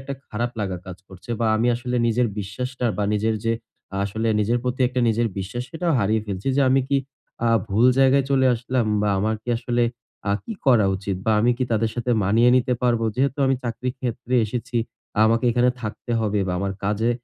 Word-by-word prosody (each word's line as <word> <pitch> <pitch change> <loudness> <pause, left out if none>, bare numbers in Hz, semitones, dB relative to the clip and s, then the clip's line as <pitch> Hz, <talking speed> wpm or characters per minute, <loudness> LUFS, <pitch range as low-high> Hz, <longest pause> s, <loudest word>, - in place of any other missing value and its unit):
একটা 135 +1 -5
খারাপ 120 +3 -2
লাগা 95 -3 -2
কাজ 90 -1 -7
করছে 95 +4 -12
বা 115 - +2
আমি 115 - +1
আসলে 125 +1 -3
নিজের 120 +2 +2
বিশ্বাসটা 125 +6 -3
বা 105 - 0
নিজের 110 +1 +1
যে 115 - +2 0.5
আসলে 110 +3 -2
নিজের 115 +4 +1
প্রতি 125 +1 -3
একটা 125 0 -2
নিজের 115 +1 +1
বিশ্বাস 100 +6 -4
সেটাও 170 0 -1
হারিয়ে 110 +1 +1
ফেলছি 100 +4 -3
যে, - - +3
"আমি 135 +1 +4
কি 140 - +2 0.5
আ - - +3 0.2
ভুল 110 +5 +3
জায়গায় 135 0 +4
চলে 135 -1 +4
আসলাম 125 0 -1 0.2
বা 105 - +1
আমার 110 +3 +1
কি 125 - -13
আসলে 120 0 0 0.5
আ - - +3
কি 230 - -5
করা 120 -6 +5
উচিত 100 0 -3
বা 110 - +4
আমি 120 +3 +3
কি 130 - +1
তাদের 110 0 +1
সাথে 120 0 -2
মানিয়ে 115 +5 +4
নিতে 125 0 +1
পারবো?" 120 -2 +2
যেহেতু 135 +2 0
আমি 135 - +3
চাকরি 120 +2 -2
ক্ষেত্রে 125 0 -3
এসেছি, 120 +2 -4 0.5
আমাকে 115 +2 +2
এখানে 125 +1 +3
থাকতে 110 +2 -5
হবে 105 -2 0
বা - - 0
আমার 100 +1 -2
কাজে 105 +3 +1
115 Hz, 200 wpm, -23 LUFS, 105-125 Hz, 0.5 s, করা